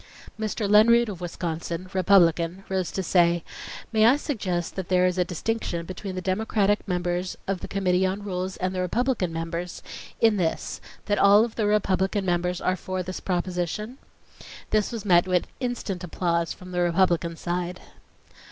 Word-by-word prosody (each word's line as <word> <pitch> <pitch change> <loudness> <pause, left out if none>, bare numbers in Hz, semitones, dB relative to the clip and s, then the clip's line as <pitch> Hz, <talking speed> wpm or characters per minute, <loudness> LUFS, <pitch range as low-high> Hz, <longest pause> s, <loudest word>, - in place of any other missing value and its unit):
Mr. 215 -1 -2
Lenroot 230 +3 +5
of 185 -4 -7
Wisconsin, 170 0 -4
Republican, 180 -1 +3
rose 190 -3 -1
to 190 - -2
say: 170 -1 +3 0.5
"May 220 0 +5
I 250 - +6
suggest 200 - -3
that 190 -2 -5
there 180 -1 +4
is 185 0 +1
a - - +4
distinction 175 -1 -3
between 185 +1 -6
the 185 - -4
Democratic 205 +2 +1
members 180 0 -2
of 195 -1 -1
the - - -7
Committee 185 -2 +1
on 190 +2 -1
Rules 185 -1 -3
and 185 0 -2
the 185 - -1
Republican 220 -1 0
members, 165 +2 -5 0.4
in 225 -2 +4
this, 165 -4 -2 0.2
that 205 -1 +1
all 205 +3 +6
of 235 - -8
the 215 -2 0
Republican 195 -1 +1
members 180 0 0
are 185 - 0
for 185 0 -4
this 185 +1 -5
proposition?" 185 - -3 0.7
This 215 -1 +2
was 225 -3 -5
met 175 -2 +5
with 180 -1 +2
instant 240 -8 -3
applause 170 -1 -1
from 185 0 -9
the 180 0 0
Republican 170 -1 +2
side. 175 +2 -3
185 Hz, 165 wpm, -25 LUFS, 175-205 Hz, 0.7 s, I